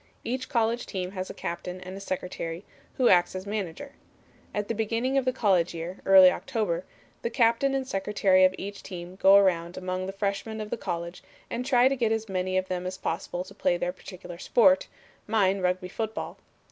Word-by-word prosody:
Each 255 Hz, +2 st, -3 dB
college 235 Hz, -2 st, 0 dB
team 185 Hz, -1 st, -4 dB
has 185 Hz, -1 st, -5 dB
a -, -, -6 dB
captain 180 Hz, +1 st, -5 dB
and 185 Hz, +1 st, -8 dB
a -, -, -7 dB
secretary, 180 Hz, -2 st, -5 dB, 0.3 s
who 255 Hz, -, +4 dB
acts 175 Hz, 0 st, +4 dB
as 185 Hz, +1 st, -5 dB
manager. 205 Hz, +5 st, -4 dB, 0.6 s
At 205 Hz, 0 st, -2 dB
the -, -, -1 dB
beginning 230 Hz, +4 st, -1 dB
of 270 Hz, -2 st, +2 dB
the 255 Hz, -, +3 dB
college 190 Hz, -9 st, +2 dB
year 170 Hz, +3 st, -6 dB
(early 190 Hz, -1 st, +9 dB
October) 210 Hz, -10 st, -2 dB, 0.4 s
the 235 Hz, -, -1 dB
captain 235 Hz, +4 st, +2 dB
and 265 Hz, -1 st, -2 dB
secretary 195 Hz, -2 st, +2 dB
of 185 Hz, 0 st, +4 dB
each 200 Hz, +1 st, -6 dB
team 180 Hz, -1 st, -8 dB
go 195 Hz, +1 st, +7 dB
around 180 Hz, -3 st, +3 dB
among 185 Hz, 0 st, -3 dB
the -, -, -3 dB
freshmen 200 Hz, +2 st, -3 dB
of 215 Hz, 0 st, -6 dB
the -, -, +1 dB
college 170 Hz, -4 st, -5 dB, 0.3 s
and 235 Hz, +2 st, -2 dB
try 250 Hz, -1 st, +4 dB
to 275 Hz, -, +1 dB
get 235 Hz, -4 st, +1 dB
as 225 Hz, 0 st, -1 dB
many 185 Hz, -1 st, -1 dB
of 185 Hz, 0 st, 0 dB
them 180 Hz, -1 st, -3 dB
as 185 Hz, +1 st, -5 dB
possible 175 Hz, +1 st, -3 dB
to 195 Hz, +1 st, -13 dB
play 175 Hz, -3 st, +1 dB
their 175 Hz, +1 st, -2 dB
particular 180 Hz, -2 st, -10 dB
sport; 275 Hz, +8 st, +4 dB, 0.4 s
mine 200 Hz, -3 st, +2 dB
Rugby 180 Hz, 0 st, 0 dB
football. 220 Hz, +3 st, -5 dB
195 Hz, 195 wpm, -27 LUFS, 180-225 Hz, 0.6 s, early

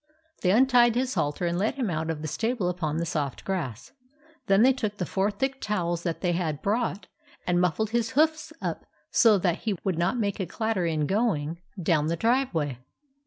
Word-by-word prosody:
They 180 Hz, -, +2 dB
untied 240 Hz, +2 st, +5 dB
his 255 Hz, +1 st, 0 dB
halter 145 Hz, -, -1 dB
and 175 Hz, +1 st, 0 dB
led 210 Hz, +3 st, 0 dB
him 245 Hz, -9 st, -1 dB
out 160 Hz, 0 st, -2 dB
of 155 Hz, -1 st, -3 dB
the -, -, -2 dB
stable 215 Hz, -, -1 dB
upon 160 Hz, -4 st, -2 dB
the 170 Hz, -, -1 dB
soft 145 Hz, -5 st, -3 dB
grass. 145 Hz, -, -4 dB, 0.6 s
Then 195 Hz, +2 st, +5 dB
they 265 Hz, +1 st, +6 dB
took 215 Hz, -5 st, -3 dB
the 180 Hz, -, -2 dB
four 195 Hz, +3 st, 0 dB
thick 270 Hz, +5 st, -2 dB
towels 175 Hz, -5 st, -1 dB
that 170 Hz, -2 st, -3 dB
they 180 Hz, -, +1 dB
had 165 Hz, -4 st, -2 dB
brought, 210 Hz, -2 st, -1 dB, 0.4 s
and 175 Hz, 0 st, +2 dB
muffled 190 Hz, +5 st, 0 dB
his 235 Hz, +1 st, 0 dB
hoofs 315 Hz, +1 st, +2 dB
up -, -, -3 dB, 0.2 s
so 225 Hz, -4 st, +6 dB
that 180 Hz, -2 st, 0 dB
he 210 Hz, -4 st, -2 dB
would 185 Hz, -4 st, -1 dB
not 180 Hz, +8 st, +1 dB
make 205 Hz, -3 st, -1 dB
a 190 Hz, -, -2 dB
clatter 215 Hz, -2 st, -1 dB
in 155 Hz, -2 st, 0 dB
going 170 Hz, -5 st, 0 dB, 0.2 s
down 160 Hz, -3 st, +2 dB
the 165 Hz, -, 0 dB
driveway. 170 Hz, -, 0 dB
185 Hz, 200 wpm, -27 LUFS, 165-225 Hz, 0.6 s, they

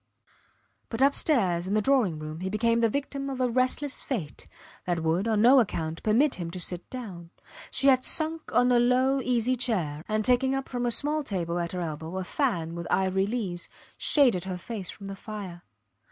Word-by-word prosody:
But 230 Hz, +3 st, 0 dB
upstairs 215 Hz, -, +3 dB
in 200 Hz, -, -1 dB
the 215 Hz, -, +3 dB
drawing 240 Hz, -, +2 dB
room 155 Hz, +1 st, -7 dB
he 185 Hz, +1 st, -3 dB
became 230 Hz, +3 st, +1 dB
the 230 Hz, -, +3 dB
victim 275 Hz, +2 st, -3 dB
of 265 Hz, -1 st, -5 dB
a 255 Hz, -, +2 dB
restless 255 Hz, +3 st, 0 dB
fate, 190 Hz, -, -5 dB, 0.4 s
that 175 Hz, -2 st, 0 dB
would, 170 Hz, +6 st, 0 dB
on 215 Hz, -1 st, +2 dB
no 260 Hz, +3 st, +7 dB
account, 165 Hz, -7 st, -2 dB
permit 255 Hz, +7 st, +2 dB
him 170 Hz, -1 st, -4 dB
to 180 Hz, +2 st, -7 dB
sit 180 Hz, 0 st, -4 dB
down. 190 Hz, -10 st, -8 dB, 0.4 s
She 270 Hz, -, +1 dB
had 260 Hz, -1 st, +5 dB
sunk 320 Hz, 0 st, +1 dB
on 245 Hz, 0 st, +3 dB
a 245 Hz, -, +4 dB
low 255 Hz, +3 st, +2 dB
easy 250 Hz, 0 st, +1 dB
chair, 175 Hz, -12 st, -2 dB
and 215 Hz, 0 st, -1 dB
taking 260 Hz, +2 st, +2 dB
up 270 Hz, 0 st, -3 dB
from 245 Hz, -1 st, -2 dB
a -, -, 0 dB
small 295 Hz, +5 st, +3 dB
table 175 Hz, -, -3 dB
at 170 Hz, 0 st, -3 dB
her 180 Hz, -, -3 dB
elbow 160 Hz, +2 st, -5 dB
a 190 Hz, -, -2 dB
fan 180 Hz, -, -1 dB
with 170 Hz, 0 st, -6 dB
ivory 190 Hz, +1 st, +1 dB
leaves, 200 Hz, -7 st, -4 dB, 0.3 s
shaded 245 Hz, -, +3 dB
her 185 Hz, -1 st, -4 dB
face 200 Hz, 0 st, -7 dB
from 200 Hz, -, -10 dB
the 195 Hz, 0 st, -6 dB
fire. 195 Hz, -4 st, -8 dB
215 Hz, 195 wpm, -27 LUFS, 175-255 Hz, 0.4 s, no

